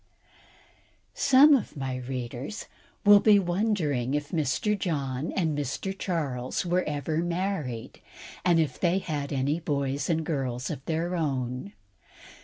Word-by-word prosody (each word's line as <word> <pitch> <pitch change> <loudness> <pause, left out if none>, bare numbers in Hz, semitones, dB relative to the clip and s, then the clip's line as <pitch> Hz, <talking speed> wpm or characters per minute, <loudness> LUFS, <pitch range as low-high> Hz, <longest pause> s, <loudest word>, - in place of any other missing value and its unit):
Some 280 +3 +6
of 240 - 0
my 130 -2 -3
readers 125 - -5 0.4
will 205 0 +9
be 210 0 +6
wondering 175 - 0
if 145 0 -2
Mr. 165 +6 +1
John 145 -6 -2
or 190 - 0
Mr. 150 +5 -2
Charles 145 -9 -2
Wesley 175 - -4
were 180 +1 +3
ever 150 +1 -2
married, 170 - -3 0.4
and 175 -2 +4
if 150 -5 -1
they 175 0 +2
had 150 -6 -3
any 140 +3 0
boys 140 -3 -2
and 160 -1 +1
girls 130 -5 -2
of 140 -4 -6
their 170 +2 -1
own. 130 - -2
155 Hz, 135 wpm, -27 LUFS, 135-180 Hz, 0.4 s, will